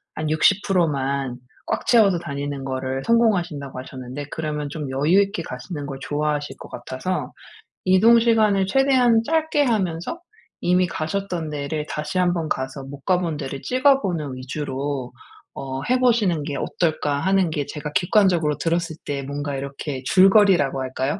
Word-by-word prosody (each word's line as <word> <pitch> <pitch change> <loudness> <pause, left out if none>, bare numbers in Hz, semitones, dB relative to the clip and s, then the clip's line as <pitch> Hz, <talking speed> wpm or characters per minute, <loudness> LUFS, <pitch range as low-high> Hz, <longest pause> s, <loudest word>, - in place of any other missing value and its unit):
한 155 0 -2
60% 180 +2 +3
만 135 -3 -2 0.3
꽉 - - -2
채워서 205 -7 +5
다니는 140 -2 -5
거를 130 0 -3
성공하신다고 175 - +1
하셨는데 130 +2 -7
그러면 150 -2 -3
좀 150 -2 -5
여유 150 +9 +3
있게 200 -3 -2
가시는 145 +3 -6
걸 135 -1 -6
좋아하실 150 0 -2
것 - - -11
같아서 130 +9 -4 0.5
이동시간을 215 0 +4
최대한 250 -1 +4
짧게 315 0 +1
하면서 195 - -1 0.4
이미 180 +1 +3
가셨던 170 0 -3
데를 150 +1 -3
다시 155 +5 -3
한번 175 -3 +1
가서 130 +1 -3
'못 140 +1 -9
가 185 - +3
본 170 -4 -2
데를 135 -1 -5
찍어보는 205 - +1
위주로 135 -1 -4 0.4
어 135 0 -5
해보시는 235 - +2
게 145 0 -4
어떨까?' 155 -4 -1
하는 190 +1 +2
게 150 -2 -2
제가 150 -1 -6
객관적으로 175 -5 +2
들었을 165 -1 -1
때 140 -1 -3
뭔가 145 +1 -4
이렇게 140 0 -5
줄거리라고 190 -6 +5
할까요? 130 +5 -2
155 Hz, 325 characters per minute, -22 LUFS, 140-195 Hz, 0.5 s, 채워서